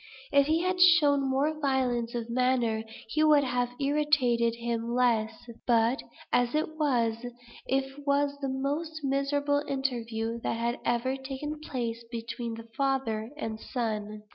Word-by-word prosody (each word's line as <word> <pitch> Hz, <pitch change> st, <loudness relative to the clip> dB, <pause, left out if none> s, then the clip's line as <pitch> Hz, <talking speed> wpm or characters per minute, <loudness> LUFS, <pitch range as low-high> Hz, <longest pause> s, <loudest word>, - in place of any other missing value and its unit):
If 280 Hz, 0 st, +5 dB
he 320 Hz, +2 st, +2 dB
had 365 Hz, 0 st, 0 dB
shown 290 Hz, -6 st, +6 dB
more 295 Hz, +4 st, +1 dB
violence 250 Hz, -4 st, 0 dB
of 235 Hz, -1 st, -3 dB
manner, 240 Hz, -2 st, +1 dB, 0.3 s
he 310 Hz, +6 st, +2 dB
would 300 Hz, -2 st, +6 dB
have 250 Hz, -2 st, 0 dB
irritated 275 Hz, -5 st, +2 dB
him 235 Hz, 0 st, -2 dB
less; 225 Hz, -3 st, +1 dB, 0.2 s
but, 235 Hz, +2 st, +3 dB, 0.3 s
as 245 Hz, +2 st, +2 dB
it 315 Hz, +1 st, -1 dB
was, 235 Hz, -6 st, +1 dB, 0.4 s
it 270 Hz, +2 st, -2 dB
was 285 Hz, 0 st, +2 dB
the 275 Hz, -, -1 dB
most 295 Hz, +4 st, -2 dB
miserable 285 Hz, +1 st, +1 dB
interview 235 Hz, -4 st, -2 dB
that 230 Hz, -, -2 dB
had 235 Hz, +1 st, -1 dB
ever 240 Hz, +3 st, 0 dB
taken 275 Hz, +3 st, -5 dB
place 235 Hz, -6 st, -4 dB
between 230 Hz, 0 st, -4 dB
the 230 Hz, 0 st, -10 dB
father 260 Hz, -5 st, 0 dB
and 220 Hz, -7 st, -4 dB
son. 215 Hz, -4 st, -3 dB
260 Hz, 140 wpm, -29 LUFS, 235-285 Hz, 0.4 s, shown